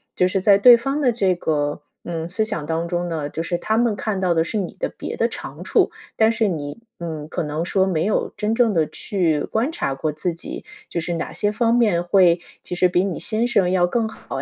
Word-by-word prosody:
就 180 - +3
是 190 +1 -1
在 200 +1 +6
对 240 +4 +9
方 275 +5 -2
的 255 -4 +3
这 195 -5 +1
个， 145 -3 -1 0.2
嗯， 165 -1 -4
思 215 +5 0
想 210 -9 -4
当 165 +1 -1
中 175 0 -2
呢， 155 -4 -3
就 160 - -4
是 175 +1 -1
他 220 - 0
们 235 -2 +2
看 205 -2 -2
到 185 -2 +2
的 160 - +3
是 190 +6 -3
你 195 -4 -3
的 - - -1
别 - - -6
的 - - +2
长 - - -8
处， - - +2 0.2
但 220 0 +4
是 225 -1 +1
你， 150 -2 -4 0.2
嗯， 160 -3 -5
可 - - -2
能 150 +2 -2
说 190 +1 +2
没 170 -3 0
有 210 - 0
真 215 +2 0
正 230 -3 +3
地 160 -4 +2
去 165 -7 -1
观 235 +7 -1
察 230 - -2
过 150 +3 -2
自 155 +4 -2
己， 165 - -8 0.2
就 - - -2
是 170 +1 -2
哪 165 - -3
些 205 -1 0
方 230 +2 +2
面 210 -8 +3
会， 175 -1 +4 0.2
其 - - -6
实 180 +1 +4
比 180 +1 +2
你 190 -5 -3
先 225 +1 0
生 200 -7 +2
要 180 -1 +3
更 220 +5 0
好 - - -7
180 Hz, 260 characters per minute, -22 LUFS, 165-220 Hz, 0.2 s, 对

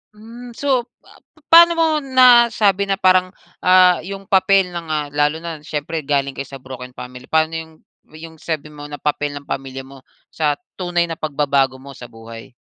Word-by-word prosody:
Hmm. 235 +2 -12
So, 260 -3 0 0.2
pa - - -20 0.3
paano 340 +1 +9
mo 330 -1 +2
nasabi 240 -7 +4
na 195 - +1
parang, 185 -1 +2 0.3
ah, 185 -1 +5
yung 195 +2 -7
papel 195 -1 +2
ng, 170 -2 -7
ah 150 -1 -2
lalo 150 +2 0
na 165 -3 -6
siyempre 150 +2 -5
galing 140 -1 0
kayo 135 0 -7
sa 135 -1 -11
broken 125 -1 -10
family? 125 0 -10
Pano 160 0 +1
yung 160 0 -7 0.3
yung 160 +1 -12
sabi 155 -2 -5
mo 145 0 -10
na 145 - -7
papel 145 0 -3
ng 145 - -8
pamilya 135 -1 -6
mo 135 0 -14 0.3
sa 150 -2 0 0.2
tunay 175 -1 0
na 165 - -6
pagbabago 140 -3 0
mo 135 +1 -12
sa 125 -2 -11
buhay? 115 0 -12
160 Hz, 180 wpm, -19 LUFS, 140-195 Hz, 0.3 s, paano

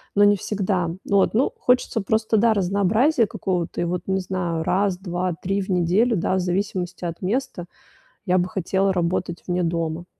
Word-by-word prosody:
но 205 - +5
не 205 0 +6
всегда. 190 -4 -1 0.2
Вот, 200 -1 +3
ну, 240 +5 +2
хочется 250 -2 +1
просто, 220 +2 +1
да, 225 +1 +4
разнообразия 210 - +2
какого-то. 180 -4 -3
И - - +1
вот, 175 +1 -3
не 190 0 +1
знаю, 175 -3 -2
раз, 190 +2 +1
2-3 185 +1 -2
в 190 - -7
неделю, 185 +6 +2
да, 180 - 0
в - - +1
зависимости 180 -1 -2
от 170 -1 -5
места, 195 -3 -2 0.6
я 185 -1 +2
бы 180 - +1
хотела 195 0 0
работать 175 -1 -2
вне 180 0 0
дома. 165 0 -2
185 Hz, 170 wpm, -23 LUFS, 175-205 Hz, 0.6 s, не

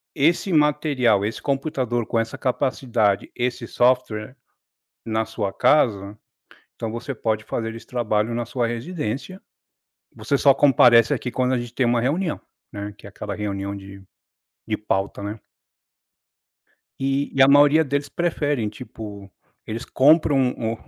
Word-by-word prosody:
esse 170 +6 +2
material, 150 - +2
esse 110 +2 -3
computador 135 -4 -1
com 115 - 0
essa 115 +3 -3
capacidade, 120 -5 0
esse 120 -1 -2
software 120 -2 0 0.7
na 110 0 -1
sua 110 -3 -4
casa, 105 -8 +2 0.6
então 115 -2 -4
você 120 +4 -5
pode 110 -2 -2
fazer 115 0 -4
esse 115 - -11
trabalho 115 -2 -1
na 120 0 -2
sua 120 0 -1
residência. 140 - -4 0.8
Você 115 +6 0
só 140 -1 +5
comparece 120 -5 +5
aqui, 125 - -2
quando 130 0 0
a - - 0
gente 120 0 -7
tem 130 - +1
uma 120 0 +2
reunião, 155 +7 -1 0.3
né, 100 -1 -6
que - - -14
é - - -8
aquela 100 +1 -6
reunião 100 -1 -4
de 100 0 -11 0.7
de 110 -1 -1
pauta, 100 -1 -2
né? 105 +2 -5 1.6
E 135 +1 0
e 135 - +2
a 135 - +8
maioria 145 +3 +6
deles 140 +1 -2
preferem, 145 -8 -1
tipo, 105 -3 -9 0.3
eles 110 +1 -5
compram 140 -2 +4
o 110 0 -2
120 Hz, 145 wpm, -23 LUFS, 110-135 Hz, 1.6 s, a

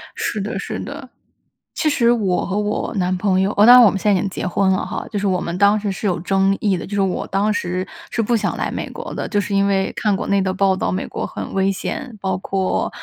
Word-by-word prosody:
是 - - -2
的， 200 - -3
是 - - -5
的。 - - -7 0.7
其 310 - +2
实 240 -5 +2
我 195 -6 0
和 195 - -2
我 210 +2 -2
男 185 -1 0
朋 190 -1 +1
友 195 - +1
哇， 205 - +6
当 245 +2 +10
然 250 - +9
我 220 - +7
们 195 - -3
现 210 - +1
在 190 - +3
已 - - 0
经 195 - -2
结 185 - -4
婚 190 +1 +2
了 185 - 0
哈。 - - -5
就 205 - -2
是 200 - -1
我 185 -2 +1
们 170 +1 -4
当 200 +2 +4
时 205 -1 -2
是 200 +2 -3
有 180 - +1
争 195 +2 +2
议 200 -3 +1
的， - - -6
就 205 - -8
是 200 - +2
我 190 -2 -1
当 200 +2 +1
时 185 -1 -2 0.3
是 230 - 0
不 235 +2 +1
想 210 - -1
来 - - -2
美 - - -4
国 - - -7
的， - - -4
就 205 - 0
是 200 +1 -4
因 200 0 +3
为 195 -1 +1
看 210 -2 0
国 - - -3
内 200 0 +2
的 190 0 -1
报 190 0 +2
道， 190 - -1
美 185 - -2
国 - - -4
很 - - -7
危 195 0 +2
险， 220 +4 -4
包 190 -1 -1
括 190 0 -1
195 Hz, 300 characters per minute, -20 LUFS, 190-210 Hz, 0.7 s, 当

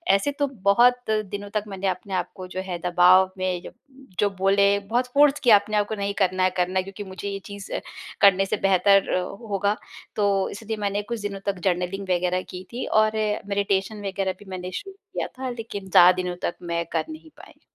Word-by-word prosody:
ऐसे 285 +9 0
तो 285 - +2 0.2
बहुत 245 +3 +4
दिनों 205 -1 -2
तक 210 - 0
मैंने 195 -1 -3
अपने 185 +1 -3
आप 185 - -1
को 185 -1 -8
जो 185 +1 -5
है 180 -2 -4
दबाव 180 +1 +5
में 185 -1 -1
ज - - -8 0.5
जो 205 - +3
बोले 200 +1 +4 0.2
बहुत 245 +2 +1
फ़ोर्स 290 0 +5
किया 240 -7 +7
अपने 210 +1 -3
आप 205 0 +1
को 220 - -3
नहीं 200 0 -2
करना 185 -2 +1
है 185 - +4
करना 180 +1 +1
है - - -1
क्योंकि 195 +2 -8
मुझे 190 +1 -6
ये 195 0 -4
चीज़ 200 -1 -9 0.5
करने 195 -1 +6
से 210 - -1
बेहतर 195 +1 +4 0.4
होगा। 200 +1 +1 0.4
तो 200 -2 +1
इसलिए 220 +1 -5
मैंने 205 0 -1
कुछ 220 +1 -5
दिनों 200 -1 -4
तक 195 -2 -1
जर्नलिंग 180 +1 -1
वग़ैरह 180 0 +1
की 180 0 -7
थी 245 - -3 0.2
और 215 0 +1 0.3
मेडिटेशन 200 +1 -1
वग़ैरह 190 -1 -1
भी 205 - -14
मैंने 185 0 -6
शुरू 390 - -6
किया 400 +1 -6
था 260 -1 -3
लेकिन 225 -5 -7
ज़्यादा 180 0 +8
दिनों 180 -1 -3
तक - - -1
मैं 170 -1 -2
कर - - 0
नहीं 315 0 -10
पाई। - - -16
200 Hz, 205 wpm, -24 LUFS, 185-210 Hz, 0.5 s, ज़्यादा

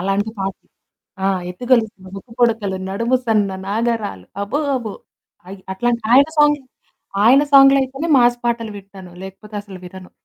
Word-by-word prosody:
అలాంటి 195 +3 -1
పా 195 - -1 0.8
ఆ! - - +3 0.2
ఎత్తుగొలుసులు 220 -2 0
ముక్కు 225 +4 -12
పుడకలు, 225 -5 +1
నడుము 230 +6 0
సన్న 210 -3 +2 0.2
నాగరాలు 215 - -2 0.2
అబ్బో 205 +8 -2 0.2
అబ్బో! 220 -5 -5 0.5
అయి, 195 +1 -9
అట్లాంటి 235 +4 -1
ఆయన 275 +2 +7
సాంగ్ 295 0 +5 0.7
ఆయన 260 +5 +6
సాంగ్‌లయితేనే 275 +2 +5
మాస్ 240 0 +3
పాటలు 235 -2 -1
వింటాను. 195 -2 -12
లేకపోతే 195 +3 -11
అసలు 195 -2 -11
వినను. 185 0 -11
220 Hz, 135 wpm, -19 LUFS, 195-245 Hz, 0.8 s, ఆయన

